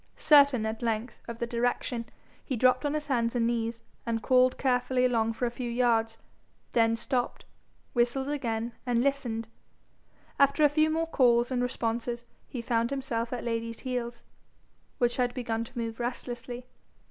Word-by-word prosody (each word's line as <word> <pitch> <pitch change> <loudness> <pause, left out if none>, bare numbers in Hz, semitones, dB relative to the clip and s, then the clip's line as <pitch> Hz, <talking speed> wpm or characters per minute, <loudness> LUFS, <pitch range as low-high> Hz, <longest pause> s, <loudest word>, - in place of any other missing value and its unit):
Certain 285 -6 +6
at 220 0 -3
length 230 0 -2
of 235 -1 -6
the 235 - -1
direction, 235 0 -1 0.4
he 260 - -2
dropped 255 +4 +3
on 290 - -1
his 300 -1 -2
hands 235 -3 0
and 235 -1 +2
knees, 230 0 -1 0.2
and 225 -1 -2
crawled 255 0 +4
carefully 255 -1 +2
along 225 -3 +2
for 225 +2 -2
a 235 - -1
few 240 0 -4
yards, 230 -2 +2 0.5
then 230 -1 +3
stopped, 245 +1 -2 0.5
whistled 245 +2 +1
again, 235 -5 -2
and 240 -1 +1
listened. 245 -5 -1 0.9
After 280 +2 +4
a 295 - +7
few 310 +2 +3
more 325 +1 +1
calls 245 -5 +3
and 250 -1 +1
responses, 235 -1 -2 0.2
he 240 -3 -6
found 235 -1 +1
himself 250 -4 -2
at 245 -2 -3
Lady's 230 -1 -3
heels, 245 -2 -4 0.7
which 240 -2 +1
had 245 -1 0
begun 230 -3 -2
to 255 +2 -13
move 230 -1 -3
restlessly. 245 0 -4
240 Hz, 160 wpm, -29 LUFS, 230-255 Hz, 0.9 s, a